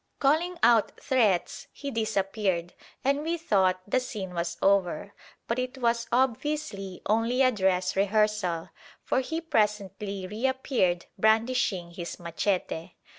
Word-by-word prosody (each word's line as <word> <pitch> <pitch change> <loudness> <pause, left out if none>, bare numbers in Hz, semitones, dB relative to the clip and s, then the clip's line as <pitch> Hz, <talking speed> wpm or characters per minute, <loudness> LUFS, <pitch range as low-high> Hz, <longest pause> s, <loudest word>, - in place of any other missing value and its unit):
Calling 325 +6 +2
out 230 -2 +4
threats, 220 -10 +1
he 280 -1 -6
disappeared, 195 -5 -1 0.3
and 280 +2 +2
we 330 +2 -1
thought 190 - +2
the 255 - +2
scene 210 -7 -6
was 170 0 -2
over; 195 -1 +1 0.3
but 235 +2 -1
it 255 +1 -3
was 235 -1 +1
obviously 245 -6 -1
only 230 +5 +2
a 255 - +5
dress 185 -4 +1
rehearsal, 200 -4 +1 0.3
for - - +1
he 320 +5 -2
presently 205 - -1
reappeared 225 - 0
brandishing 220 -5 +2
his 170 0 -6
machete. 175 0 -2
210 Hz, 125 wpm, -28 LUFS, 185-255 Hz, 0.3 s, a